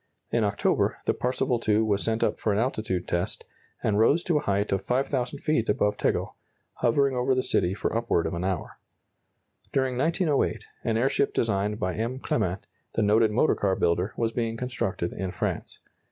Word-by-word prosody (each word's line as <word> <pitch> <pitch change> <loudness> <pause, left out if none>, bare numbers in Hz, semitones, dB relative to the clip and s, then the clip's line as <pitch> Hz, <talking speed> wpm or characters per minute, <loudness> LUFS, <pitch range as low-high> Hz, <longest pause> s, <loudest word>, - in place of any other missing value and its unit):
In 115 -1 +2
October, 100 -1 +1
the - - +2
"Parseval 125 -1 0
II" 105 +1 +4
was 105 -2 +1
sent 115 0 0
up - - 0
for 110 - 0
an 100 - +1
altitude 110 -6 -1
test, 85 +2 -2 0.4
and 105 -1 +2
rose 145 +10 +4
to 165 -4 +2
a - - -5
height 100 +1 0
of 95 0 0
5,000 130 +3 -1
feet 150 -7 +1
above 105 0 +2
Tegel, - - -1 0.4
hovering 135 +3 +2
over 125 +1 +2
the 130 - +1
city 90 +2 +1
for 105 - -2
upward 115 -7 +1
of 80 - -2
an 85 +1 -3
hour. 95 -3 -3 0.9
During 130 -2 0
1908, 160 0 +1 0.2
an 110 -1 +1
airship 135 +3 +1
designed 105 -1 0
by 90 0 -1
M. 115 +4 -2
Clement, 95 -7 -1 0.3
the 110 - +1
noted 110 +2 +4
motor 120 +8 +3
car 95 -2 +1
builder, 90 +4 0
was 115 -1 0
being 115 -1 -2
constructed 115 -8 -2
in 95 0 -3
France. - - -3
115 Hz, 180 wpm, -27 LUFS, 100-125 Hz, 0.9 s, II